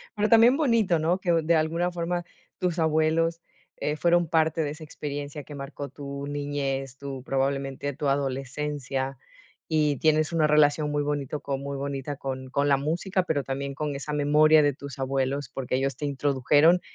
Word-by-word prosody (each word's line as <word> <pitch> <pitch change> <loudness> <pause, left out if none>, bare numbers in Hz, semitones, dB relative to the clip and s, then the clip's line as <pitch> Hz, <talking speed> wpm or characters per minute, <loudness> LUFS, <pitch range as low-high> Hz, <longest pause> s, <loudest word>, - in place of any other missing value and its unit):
Pero 210 +1 +1
también 230 +3 +7
bonito, 230 - +2
¿no?, 170 +4 +1
que 175 -2 +1
de 165 0 +3
alguna 165 +3 +1
forma 175 0 -2 0.4
tus 180 -2 -1
abuelos, 160 +1 +2 0.3
eh, 150 +1 -2
fueron 175 +1 +3
parte 160 0 +2
de 145 - -2
esa 155 +1 -9
experiencia 145 -1 -6
que 150 - -11
marcó 140 0 -6
tu 140 -1 -7
niñez, 140 -2 -3
tu 135 -2 -7
probablemente 135 +1 -1
tu 145 +1 -3
adolescencia, 135 0 -2 0.5
y 150 -3 +1
tienes 155 +2 +2
una 160 -2 +3
relación 150 0 +3
muy 145 0 0
bonito 145 0 -3
con 135 -1 -3
muy 140 0 -4
bonita 140 0 -4
con 130 -1 -5
con 140 +2 +1
la 140 - +5
música, 175 +6 -1
pero 150 -5 -1
también 140 +1 -4
con 150 -1 -3
esa 150 +2 -5
memoria 150 +1 +5
de 145 - +3
tus 140 +1 -9
abuelos, 135 +1 -1
porque 130 -1 -2
ellos 135 +1 -1
te 145 - -4
introdujeron 145 +4 +3
145 Hz, 175 wpm, -26 LUFS, 140-160 Hz, 0.5 s, también